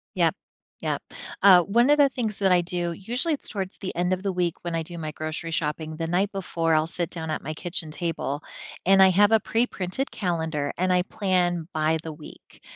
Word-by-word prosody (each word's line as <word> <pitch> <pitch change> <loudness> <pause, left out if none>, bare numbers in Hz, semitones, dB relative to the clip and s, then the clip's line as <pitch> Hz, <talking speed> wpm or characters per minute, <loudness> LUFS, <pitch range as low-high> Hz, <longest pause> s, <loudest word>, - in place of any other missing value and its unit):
Yep. - - +3 0.5
Yep. - - -1 0.4
Uh, 185 -3 +8
one 235 +8 +3
of 295 - +6
the 285 -2 +6
things 225 -6 -3
that 195 -2 +3
I 180 - +6
do, 175 0 -2
usually 245 - -2
it's 290 - 0
towards 195 -3 -4
the 190 - -6
end 180 +1 0
of 185 +1 -3
the 195 - 0
week 175 -2 0
when 170 -1 -3
I 165 - -1
do 170 +2 -9
my 155 -2 -4
grocery 155 +2 -5
shopping 155 0 -2
the 165 +1 -3
night 185 +5 +1
before, 165 -4 0
I'll 155 0 +3
sit 170 0 -3
down 160 -3 -5
at - - -2
my 155 - -5
kitchen 165 0 -5
table, 155 -3 -3 0.4
and 195 +1 +6
I 190 - +8
have 205 +3 +4
a 225 - +6
preprinted 225 +1 -2
calendar, 160 -6 -2
and 185 +1 +1
I 180 0 +3
plan 180 -4 0
by 155 +1 +1
the 160 - -5
week. 150 0 -14
175 Hz, 215 wpm, -25 LUFS, 160-195 Hz, 0.5 s, Uh